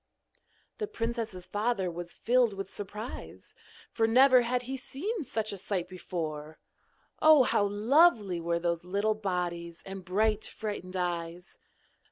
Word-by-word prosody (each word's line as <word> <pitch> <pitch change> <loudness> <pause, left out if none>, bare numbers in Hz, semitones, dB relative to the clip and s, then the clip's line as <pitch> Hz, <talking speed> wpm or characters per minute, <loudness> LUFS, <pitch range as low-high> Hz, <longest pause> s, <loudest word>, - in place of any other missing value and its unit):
The 425 - -2
princess's 230 - -3
father 205 -4 -1
was 175 +1 -7
filled 240 -2 +3
with 195 0 -6
surprise, 210 +4 -7 0.4
for 225 -1 +2
never 255 +2 +6
had 245 +1 0
he 260 +2 -4
seen 330 - -4
such 220 -5 -3
a 200 - -6
sight 180 -2 -2
before. 160 -4 -5 0.6
Oh! 310 -3 +8
how 205 - +2
lovely 210 - +3
were 170 0 0
those 170 0 -1
little 200 +4 +1
bodies, 175 -4 -3
and 195 -1 -7
bright 210 +3 +1
frightened 205 -4 -5
eyes! 175 -1 -4
205 Hz, 135 wpm, -30 LUFS, 180-235 Hz, 0.6 s, Oh